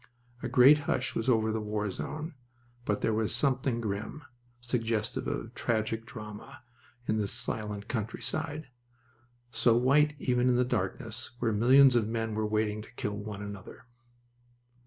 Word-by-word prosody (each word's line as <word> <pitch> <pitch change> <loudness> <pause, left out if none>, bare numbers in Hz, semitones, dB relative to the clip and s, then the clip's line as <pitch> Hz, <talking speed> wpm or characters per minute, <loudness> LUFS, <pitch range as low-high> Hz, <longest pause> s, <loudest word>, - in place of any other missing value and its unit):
A 125 - -3
great 130 +5 +7
hush 130 - 0
was 115 - -1
over 110 -2 +3
the 110 0 -1
war 105 -1 -2
zone, 155 - -5 0.5
but 105 - 0
there 110 - +1
was 110 0 0
something 130 -3 +1
grim, 110 +6 -4 0.4
suggestive 115 -3 -1
of - - -4
tragic 110 0 -1
drama, 110 -2 -9 0.4
in 110 - +1
this 105 -2 -1
silent 105 -1 -3
countryside, 145 +7 -3 0.8
so 115 -1 +3
white 145 +4 +4
even 125 -2 +2
in 125 - +3
the 125 +1 +3
darkness, 110 +2 -3
where 115 -2 0
millions 130 +4 +6
of 115 -3 +3
men 110 -1 -2
were 110 0 0
waiting 105 0 0
to 110 - -13
kill 105 -3 -3
one 105 0 -6
another. 100 +2 -9
115 Hz, 150 wpm, -30 LUFS, 105-125 Hz, 0.8 s, great